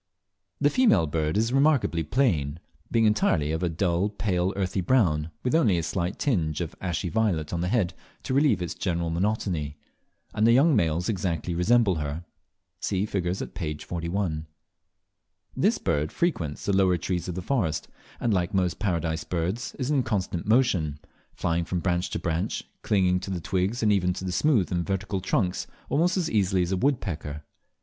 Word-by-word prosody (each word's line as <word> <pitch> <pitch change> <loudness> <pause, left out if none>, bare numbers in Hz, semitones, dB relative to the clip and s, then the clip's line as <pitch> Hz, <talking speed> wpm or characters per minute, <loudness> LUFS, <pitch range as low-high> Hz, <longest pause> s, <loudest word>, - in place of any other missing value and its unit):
The 145 0 +3
female 250 - +4
bird 80 +2 -1
is 115 +3 +1
remarkably 135 - +3
plain, 80 - 0 0.3
being 115 -1 +3
entirely 85 -8 +2
of 80 +1 -2
a 90 - +1
dull 90 +3 0
pale 95 -3 0
earthy 95 -1 -1
brown, 85 -8 +2
with 125 - 0
only 115 - +4
a 85 - -1
slight 85 +3 -2
tinge 85 - 0
of 85 -3 -3
ashy 90 0 -2
violet 85 -4 0
on 85 - -1
the 90 - 0
head 95 -5 +1 0.3
to - - -2
relieve 135 -9 +3
its 85 - -3
general 85 -2 -2
monotony; 85 -5 -1 0.6
and 110 +2 +3
the 115 - +6
young 140 +4 +5
males 85 -3 +1
exactly 90 -4 -1
resemble 95 +2 +3
her. 75 +3 -4 0.5
(See 95 0 0
figures 95 -3 -2
at - - -9
p. 75 -5 -3
41.) 85 -1 -3 1.1
This - - +2
bird, 75 +1 -1
frequents 85 - -1
the 100 - +1
lower 95 -2 +4
trees 90 +1 -2
of 90 - -4
the 90 - -4
forests, 90 - -1 0.3
and, 115 - +1
like 90 -1 0
most 90 -4 +1
Paradise 80 -5 -1
Birds, 90 +9 -3
is 130 +1 -2
in 140 -3 +3
constant 100 -6 -2
motion 95 - +2 0.3
flying 85 0 0
from 90 +1 -2
branch 90 0 0
to - - -2
branch, 85 -1 -2 0.2
clinging 90 -3 +2
to 95 - -7
the 95 -2 -2
twigs 95 +7 -1
and 105 -1 +4
even 90 -2 +2
to 95 - -6
the 90 - -2
smooth 110 - +2
and 85 -1 0
vertical 95 +1 -2
trunks 90 0 0 0.2
almost 175 +5 +2
as 175 -3 +1
easily 95 -3 +2
as 90 - -3
a 95 - +1
woodpecker. 85 - -1
90 Hz, 180 wpm, -26 LUFS, 85-105 Hz, 1.1 s, the